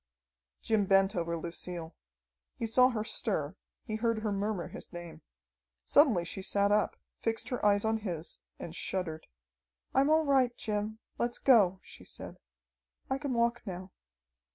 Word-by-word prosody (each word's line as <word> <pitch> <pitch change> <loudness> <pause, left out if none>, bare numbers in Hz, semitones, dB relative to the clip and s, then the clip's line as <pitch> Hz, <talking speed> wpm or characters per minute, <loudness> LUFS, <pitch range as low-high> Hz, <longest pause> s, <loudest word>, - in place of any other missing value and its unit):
Jim 210 -3 +2
bent 195 +1 +4
over 170 -1 -1
Lucille. 170 0 -5 0.6
He 230 - -2
saw 250 +3 +5
her 220 -4 -2
stir, - - -2 0.3
he 215 -3 -3
heard 230 -1 0
her 215 - 0
murmur 200 -2 -2
his - - -10
name. 175 -1 -8 0.6
Suddenly 245 - +5
she 190 - -4
sat 200 +1 +2
up, 210 0 +2 0.2
fixed 225 -1 -1
her 250 - -3
eyes 205 0 +4
on 220 0 +2
his, 175 -7 -5 0.2
and 170 - -7
shuddered. 165 -5 -3 0.7
"I'm 275 +2 +4
all 315 0 +4
right, 260 -4 +3
Jim. 215 0 -2 0.2
Let's 240 0 0
go," 200 -8 +5
she - - -13
said. - - -9 0.7
"I 265 - +1
can 280 -2 -2
walk 235 0 +2
now." 185 0 -6
210 Hz, 155 wpm, -31 LUFS, 185-235 Hz, 0.7 s, saw